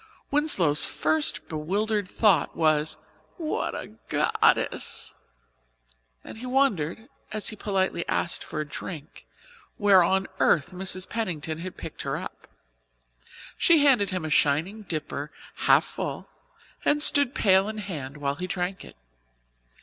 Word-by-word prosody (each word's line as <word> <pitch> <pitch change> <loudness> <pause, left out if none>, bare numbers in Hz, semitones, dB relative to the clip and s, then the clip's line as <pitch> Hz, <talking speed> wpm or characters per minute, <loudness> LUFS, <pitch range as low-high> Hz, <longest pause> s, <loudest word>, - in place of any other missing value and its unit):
Winslow's 190 - +4
first 155 -1 0
bewildered 200 +6 -1
thought 205 -2 +2
was 155 -1 +1 0.4
"What 320 -4 -2
a - - -6 0.2
goddess!" - - +1 1.1
and - - -10
he 255 - -6
wondered, 220 - 0 0.2
as 215 -1 -2
he 215 - -7
politely 190 -4 -1
asked 170 - -1
for 155 - -6
a 155 - -3
drink, 155 +1 -9 0.5
where 200 -3 +6
on 190 +2 +1
earth 170 +3 +3
Mrs. 185 0 -2
Pennington 165 -8 -3
had 185 +2 -7
picked - - -8
her - - -2
up. - - -9 1.1
She 320 -4 +5
handed 245 -8 +4
him 185 -4 -3
a 155 - -4
shining 160 +10 +1
dipper 150 -2 -4 0.4
half - - +6
full - - -5 0.6
and 295 0 +3
stood, 285 -3 +5
pail 195 0 +3
in 215 - -6
hand, 150 -9 -6
while 140 -1 -1
he 180 +5 -5
drank 180 +1 -3
it. - - -14
185 Hz, 135 wpm, -26 LUFS, 155-215 Hz, 1.1 s, where